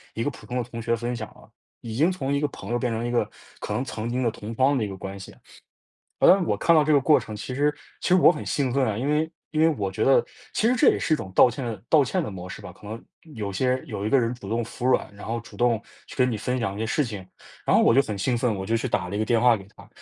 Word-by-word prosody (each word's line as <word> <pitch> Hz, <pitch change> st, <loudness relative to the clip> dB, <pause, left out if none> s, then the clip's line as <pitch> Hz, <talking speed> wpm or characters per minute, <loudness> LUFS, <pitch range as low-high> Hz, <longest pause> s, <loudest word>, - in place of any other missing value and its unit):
一 115 Hz, -, -1 dB
个 -, -, 0 dB
普 -, -, -14 dB
通 125 Hz, -, -3 dB
的 125 Hz, -, 0 dB
同 115 Hz, 0 st, -8 dB
学 115 Hz, +1 st, +1 dB
分 120 Hz, +2 st, -3 dB
享 110 Hz, -3 st, -5 dB
了， -, -, -18 dB, 0.3 s
已 110 Hz, -1 st, -6 dB
经 160 Hz, +8 st, +3 dB
从 140 Hz, -7 st, -2 dB
一 140 Hz, -, +1 dB
个 150 Hz, -, +1 dB
朋 140 Hz, -, -9 dB
友 120 Hz, -, +1 dB
变 125 Hz, -2 st, -1 dB
成 115 Hz, +1 st, -2 dB
一 120 Hz, -, -2 dB
个 120 Hz, -, +1 dB, 0.3 s
可 -, -, -6 dB
能 130 Hz, -, -1 dB
曾 115 Hz, -1 st, -4 dB
经 125 Hz, +1 st, -1 dB
的 115 Hz, -, +1 dB
同 110 Hz, +2 st, -8 dB
窗 135 Hz, +3 st, +3 dB
的 125 Hz, -, 0 dB
一 -, -, -2 dB
个 95 Hz, -1 st, -7 dB
关 95 Hz, +1 st, -7 dB
系。 95 Hz, -, -11 dB, 0.8 s
呃， 190 Hz, +1 st, +6 dB
我 -, -, +1 dB
看 170 Hz, -, +4 dB
到 155 Hz, -, +5 dB
这 155 Hz, -, +1 dB
个 145 Hz, -, +6 dB
过 150 Hz, +3 st, +4 dB
程， 110 Hz, -, -8 dB
其 110 Hz, +4 st, -6 dB
实 145 Hz, +3 st, +2 dB, 0.3 s
其 -, -, -2 dB
实 180 Hz, -, +5 dB
我 180 Hz, -, +7 dB
很 -, -, -6 dB
兴 130 Hz, -4 st, -1 dB
奋 140 Hz, -, +2 dB
啊， 105 Hz, -2 st, -1 dB
因 130 Hz, +5 st, -2 dB
为 155 Hz, +2 st, +1 dB, 0.2 s
因 155 Hz, -, +1 dB
为 160 Hz, -, +6 dB
我 100 Hz, -2 st, -2 dB
觉 -, -, -1 dB
得 135 Hz, -, +4 dB, 0.3 s
其 220 Hz, -, +2 dB
实 250 Hz, -, +3 dB
这 230 Hz, -, +5 dB
也 -, -, +1 dB
是 155 Hz, -, 0 dB
一 -, -, +3 dB
种 95 Hz, -, -7 dB
道 -, -, +8 dB
歉 120 Hz, -3 st, -5 dB
道 155 Hz, -3 st, +6 dB
歉 175 Hz, +6 st, -1 dB
的 105 Hz, -, -5 dB
模 90 Hz, -1 st, -8 dB
式 -, -, -8 dB
吧， -, -, -9 dB
可 105 Hz, -, -14 dB
能 110 Hz, +2 st, -7 dB, 0.3 s
有 105 Hz, -2 st, -4 dB
些 130 Hz, +4 st, +1 dB
有 100 Hz, -, -5 dB
一 -, -, 0 dB
个 135 Hz, -, +4 dB
人 115 Hz, 0 st, 0 dB
主 120 Hz, -5 st, -10 dB
动 115 Hz, +1 st, 0 dB
服 120 Hz, +2 st, -7 dB
软， 125 Hz, -5 st, +1 dB
然 100 Hz, -, -11 dB
后 115 Hz, +1 st, -2 dB
主 -, -, -14 dB
动 120 Hz, -2 st, +2 dB, 0.3 s
去 -, -, -11 dB
跟 125 Hz, -1 st, +3 dB
你 110 Hz, -, -2 dB
分 125 Hz, +4 st, -2 dB
享 110 Hz, -5 st, -2 dB
一 -, -, -7 dB
些 110 Hz, -, -1 dB
事 145 Hz, +7 st, +1 dB
情， 105 Hz, -5 st, -7 dB, 0.4 s
然 -, -, +3 dB
后 -, -, +5 dB
我 -, -, +5 dB
就 135 Hz, -, +6 dB
很 105 Hz, -6 st, -5 dB
兴 120 Hz, +6 st, 0 dB
奋， 115 Hz, -3 st, 0 dB
我 95 Hz, -, -5 dB
就 115 Hz, +3 st, 0 dB
去 125 Hz, -, -2 dB
打 90 Hz, -6 st, -1 dB
了 100 Hz, -, -4 dB
一 -, -, -1 dB
个 110 Hz, -, +1 dB
电 115 Hz, 0 st, +2 dB
话 120 Hz, 0 st, +5 dB
给 95 Hz, -1 st, -13 dB
她， -, -, -15 dB
120 Hz, 345 characters per minute, -25 LUFS, 110-135 Hz, 0.8 s, 道